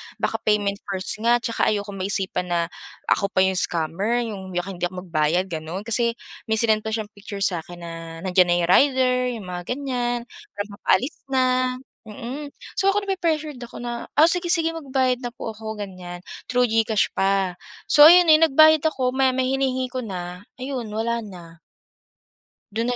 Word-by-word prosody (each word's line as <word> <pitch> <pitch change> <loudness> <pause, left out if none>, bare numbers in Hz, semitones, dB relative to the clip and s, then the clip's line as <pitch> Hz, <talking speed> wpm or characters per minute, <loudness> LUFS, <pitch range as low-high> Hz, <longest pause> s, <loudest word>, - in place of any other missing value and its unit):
baka - - -2
payment 205 -1 +1
first 190 -1 -3
nga 235 +2 +3
tsaka 230 - 0
ayokong 205 -2 -4
maisipan 190 -2 -2
na 170 - +2 0.5
ako 200 - +3
pa 185 - +3
'yung 190 -1 +3
scammer, 190 +9 0
'yung 190 -3 -7
baka 175 +2 -2
hindi 175 - -9
ako 185 - -13
magbayad, 165 +3 +1
gano'n. 170 +5 -6
Kasi 235 +1 +2 0.5
may 220 - +2
sinend 220 -2 +3
pa 220 - -4
siyang 220 -1 -2
picture 205 0 -8
sa 185 -4 0
akin 175 0 -11
na 170 -1 -7 0.3
nandiyan 180 -1 +4
na - - +4
'yung 170 - -1
rider, 255 +3 +4 0.2
'yung 200 - -9
mga 180 -1 -5
ganiyan, 245 -2 -1 0.3
parang 205 +1 -5
papaalis 265 +9 +1
na, 260 -1 +2 0.7
mm. 260 +7 -6 0.2
So, 390 - +2
ako, 405 +1 0
napre-pressured 315 -8 -2
ako 240 0 -9
na, 240 -1 -5
oh, 310 - +8
sige, 350 0 0
sige, 330 -2 +2
magbabayad 260 -5 0
na 245 - -3
po 230 -2 -7
ako, 220 0 -7
ganiyan. 180 -3 -8 0.2
Through 250 0 +3
GCash 220 -2 +2
pa, 195 -1 +1 0.3
so, 295 +1 +8
ayun, 355 +1 +7
eh, 310 - +5
nagbayad 315 0 +6
ako, 260 -5 0
maya-maya 260 -1 +2
hinihingi 260 -1 0
ko 255 - -2
na, 180 -4 -6 0.2
ayun 255 -3 -5
wala 230 +2 -1
na. 175 -6 -11 1.2
Do'n 230 +2 -1
na 245 - 0
220 Hz, 180 wpm, -23 LUFS, 190-260 Hz, 1.2 s, oh